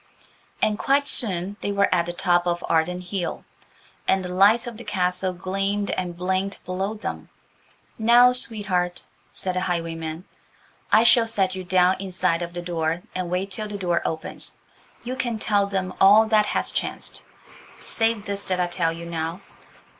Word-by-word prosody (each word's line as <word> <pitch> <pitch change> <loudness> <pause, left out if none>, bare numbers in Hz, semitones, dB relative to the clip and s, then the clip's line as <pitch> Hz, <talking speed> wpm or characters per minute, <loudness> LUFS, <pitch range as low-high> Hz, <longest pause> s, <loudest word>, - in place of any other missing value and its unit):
And 210 -1 +1
quite 280 +1 +2
soon 200 -7 0
they 205 - -2
were 200 0 +3
at 170 -1 +1
the - - -2
top 175 0 +2
of 175 0 -1
Arden 170 +2 +1
Hill, 180 0 -4 0.6
and 190 -1 +2
the 180 - -5
lights 205 +5 +5
of 235 -2 -7
the 240 - -9
castle 185 0 -1
gleamed 195 +3 -2
and 175 -2 -3
blinked 190 +2 -2
below 190 +4 -2
them. 215 - -6 0.7
"Now, 240 +3 +6
sweetheart," 195 -7 0 0.3
said 185 - -3
the - - +1
highwayman, 165 -1 -3 0.7
"I 220 - +6
shall 235 -1 +5
set 195 -4 +1
you 185 0 -5
down 180 +1 +3
in 195 -1 -6
sight 180 -2 +1
of 175 0 -5
the 175 0 -5
door 170 0 -2
and 185 -1 -3
wait 185 +2 -2
till 215 +2 -3
the 210 -1 -5
door 175 -3 0
opens. 160 -1 -4 0.5
You 250 +2 -4
can 240 -3 -2
tell 205 -2 +1
them 190 -2 -2
all 205 +3 +7
that 215 -1 +3
has - - 0
chanced, - - -2 0.6
save 225 -2 +1
this 200 0 -2
that 185 -1 0
I 180 - +2
tell 175 -1 -1
you 165 +1 -7
now. 165 +2 -4
185 Hz, 175 wpm, -24 LUFS, 175-205 Hz, 0.7 s, all